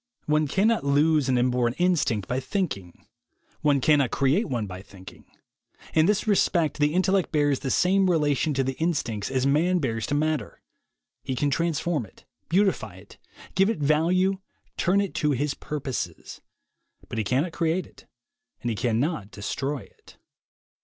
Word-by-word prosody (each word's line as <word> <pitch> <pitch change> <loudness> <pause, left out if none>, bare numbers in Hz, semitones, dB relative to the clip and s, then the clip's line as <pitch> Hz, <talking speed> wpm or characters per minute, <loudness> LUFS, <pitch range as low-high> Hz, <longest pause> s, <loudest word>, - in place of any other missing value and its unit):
One 150 0 +2
cannot 210 +8 +2
lose 145 0 +3
an 130 - +3
inborn 125 -1 +1
instinct 165 - +1
by 125 - -1
thinking; 130 - -4 0.5
one 145 -2 +2
cannot 140 -1 +3
create 140 - +1
one 120 -5 -1
by 95 -1 -8
thinking. 95 -2 -14 0.7
In 160 +1 +4
this 210 0 +1
respect 175 -7 +2
the 150 +2 +2
intellect 190 0 +2
bears 145 -3 +2
the 135 - -4
same 190 +5 +3
relation 150 -2 +1
to 135 - +1
the 135 +1 -2
instincts 135 -11 -1
as 130 -1 0
man 160 +6 +3
bears 115 -8 -2
to 145 - -1
matter. 155 -1 -1 0.6
He 130 - -3
can 145 +3 0
transform 165 -4 -1
it, - - -22 0.2
beautify 180 - +1
it, 95 +2 -16 0.3
give 195 +3 +3
it 225 - -1
value, 170 +6 +2 0.4
turn 190 +3 +2
it 200 - -3
to 150 -2 +2
his 145 +2 -1
purposes; 140 -4 -5 0.7
but 115 - -4
he - - +1
cannot 135 - 0
create 165 +2 0
it - - -19 0.6
and 120 - 0
he - - -2
cannot 120 - -1
destroy 135 +7 -4
it. - - -19
145 Hz, 160 wpm, -25 LUFS, 125-170 Hz, 0.7 s, In